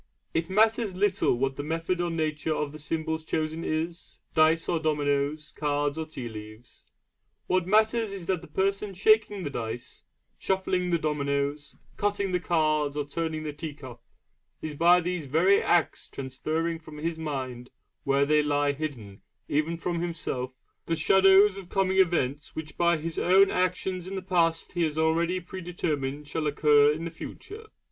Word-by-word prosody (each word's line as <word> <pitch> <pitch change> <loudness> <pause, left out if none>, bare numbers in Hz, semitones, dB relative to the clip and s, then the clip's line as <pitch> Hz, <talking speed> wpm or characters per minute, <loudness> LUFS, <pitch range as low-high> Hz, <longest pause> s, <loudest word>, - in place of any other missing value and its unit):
It 165 0 -1
matters 220 0 +2
little 195 -9 +2
what 135 +1 -1
the 145 - -3
method 165 +3 -1
or 175 - 0
nature 155 -1 -1
of 150 -1 -2
the 155 - -9
symbols 160 +1 -2
chosen 160 +1 -2
is 165 +2 -4
dice 160 +1 +3
or 170 - +1
dominoes, 150 -1 -1
cards 145 -1 0
or 160 -1 -4
tea 130 -6 -6
leaves. 110 +1 -11 0.6
What 185 -1 +1
matters 220 +1 +3
is 195 -3 -6
that 185 -2 0
the - - -12
person 195 +1 -1
shaking 210 0 +3
the 145 - -3
dice, 120 -1 -6 0.4
shuffling 185 -1 0
the 170 - +2
dominoes, 145 -1 -2 0.2
cutting 200 -1 0
the 180 - +1
cards 155 -4 +1
or 145 - -1
turning 160 +1 -3
the 150 -1 -4
tea 150 0 -6
cup, 125 -5 -11 0.6
is 155 - -5
by 175 +4 +5
these 175 -3 -3
very 175 +8 +4
acts 170 -4 +1
transferring 155 +5 -3
from 155 -1 -12
his 160 +1 -3
mind 130 -5 -4 0.3
where 140 0 +2
they 150 +1 +4
lie 145 -1 +1
hidden 130 -10 -6 0.3
even 155 +3 0
from 170 0 -2
himself 135 -7 -3 0.3
the 165 - +1
shadows 190 +4 +5
of 185 -2 -12
coming 190 -1 +1
events 150 -6 +1
which 160 -1 -6
by 170 -1 +3
his 160 +1 -4
own 190 +2 +5
actions 185 0 -1
in 195 - -5
the 190 - -4
past 170 -3 +1
he 175 - -2
has 155 -2 0
already 165 +3 +2
predetermined 160 -6 -4
shall 155 +1 -2
occur 145 0 +5
in 160 +2 -4
the 170 - -4
future. 420 - -9
160 Hz, 170 wpm, -27 LUFS, 145-180 Hz, 0.6 s, by